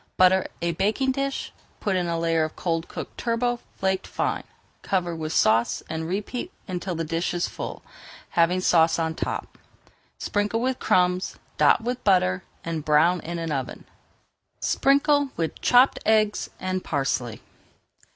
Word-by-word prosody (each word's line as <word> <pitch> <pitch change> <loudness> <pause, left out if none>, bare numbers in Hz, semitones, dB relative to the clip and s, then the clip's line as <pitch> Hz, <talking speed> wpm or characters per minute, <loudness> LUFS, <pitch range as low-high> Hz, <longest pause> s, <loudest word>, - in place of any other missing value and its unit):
Butter 185 +1 +5 0.2
a 170 - +1
baking 215 +10 +1
dish, 275 +1 -3 0.3
put 200 -2 0
in 180 -1 0
a 170 0 -1
layer 165 -1 +1
of 155 - -4
cold 165 -2 -2
cooked - - -8
turbot 240 +1 0 0.2
flaked 190 0 0
fine, - - -2 0.4
cover 175 -3 -1
with 155 -1 -4
sauce, 115 -5 +2
and 160 0 -3
repeat 205 +7 -3 0.2
until 180 -1 -3
the 165 - -2
dish 165 +2 -2
is 175 - 0
full, - - -7 0.5
having 175 +2 +2
sauce 165 -2 +4
on 160 -1 0
top. - - -4 0.6
Sprinkle 205 +2 -1
with 255 +2 -1
crumbs, 180 0 +2 0.2
dot - - +5
with 250 +1 -3
butter, 140 - +3 0.2
and 165 -2 -3
brown 160 +4 +4
in 170 +1 -5
the 165 -3 -2
oven. 130 -2 -5 0.7
Sprinkle 285 +1 +3
with 165 -1 -3
chopped 250 +2 +5
eggs 215 -1 +2
and 185 0 -2
parsley. 130 -5 -2
180 Hz, 150 wpm, -25 LUFS, 165-210 Hz, 0.7 s, Butter